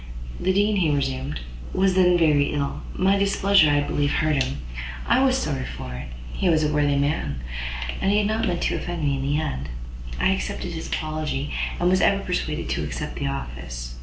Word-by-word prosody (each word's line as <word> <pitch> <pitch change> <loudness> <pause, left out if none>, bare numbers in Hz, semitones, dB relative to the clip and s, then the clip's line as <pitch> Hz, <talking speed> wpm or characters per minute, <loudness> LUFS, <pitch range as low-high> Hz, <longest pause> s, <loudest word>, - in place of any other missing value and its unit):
"The 190 - +2
Dean," 205 +2 +2
he 170 -5 +3
resumed, 130 - -2 0.3
"was 190 0 +3
then 180 -1 +5
very 150 -4 +3
ill; 140 -1 -2
my 195 +2 +3
displeasure, 200 -4 +4
I 145 0 +3
believe, 145 0 0
hurt 155 -3 +2
him. 70 - -1 0.5
I 255 +3 +4
was 265 -1 +4
sorry 135 - -2
for 65 - -6
it; 60 +2 -6 0.3
he 185 - +1
was 160 -2 +3
a 150 0 +1
worthy 145 -1 +2
man, 140 - 0 0.6
and 195 - +2
had 210 0 +3
not 220 +1 0
meant 175 -2 -1
to - - +1
offend 175 -2 -4
me; 140 -1 +1
in - - -3
the 140 +2 +1
end, 75 - -3 0.5
I 65 - +3
accepted 65 -1 -2
his - - -5
apology, 150 - -2 0.3
and 175 - +2
was 185 +1 +4
even 200 0 +4
persuaded 180 -2 -2
to - - -1
accept - - -4
the - - -2
office. - - -5
150 Hz, 195 wpm, -24 LUFS, 135-185 Hz, 0.6 s, then